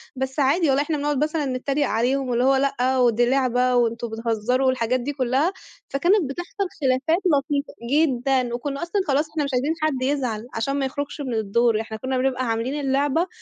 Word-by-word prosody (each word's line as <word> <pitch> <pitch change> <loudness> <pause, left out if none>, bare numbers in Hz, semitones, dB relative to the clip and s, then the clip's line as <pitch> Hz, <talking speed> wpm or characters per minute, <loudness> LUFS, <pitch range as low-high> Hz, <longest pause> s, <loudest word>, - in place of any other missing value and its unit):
بس 265 +2 -3
عادي 300 +5 +3
والله 270 +1 +3
إحنا 300 0 -2
بنقعد 290 0 0
مثلًا 305 -1 -1
نتّريق 270 +2 -1
عليهم، 255 +4 0
واللي 240 0 +1
هو 270 +1 +4
لأ، 265 -1 +1
ودي 240 -1 +3
لعبة 255 -1 +2
وأنتم 235 -1 +1
بِتهزّروا 230 +3 0
والحاجات 255 -1 +1
دي 270 +4 -3
كُلّها، 270 +6 +1 0.4
فكانت 340 +2 +2
بتحصل 350 +6 -4
خلافات 275 +6 +1
لطيفة. 285 -2 0 0.2
جدًا. 265 -4 +2
وكُنّا 275 +3 -4
أصلًا 365 +4 0
خلاص 290 +2 +1
إحنا 300 -1 -2
مش 280 - -2
عايزين 270 +6 +1
حد 305 -4 0
يزعل 250 -5 -1
عشان 275 +5 -1
ما 270 - 0
يخرجش 285 +2 -4
من 260 -4 -3
الدور، 220 +1 +1
إحنا 220 0 -7
كُنّا 260 +3 -2
بنبقى 255 0 0
عاملين 230 +6 -1
اللعبة 285 +5 +1
265 Hz, 185 wpm, -23 LUFS, 245-290 Hz, 0.4 s, هو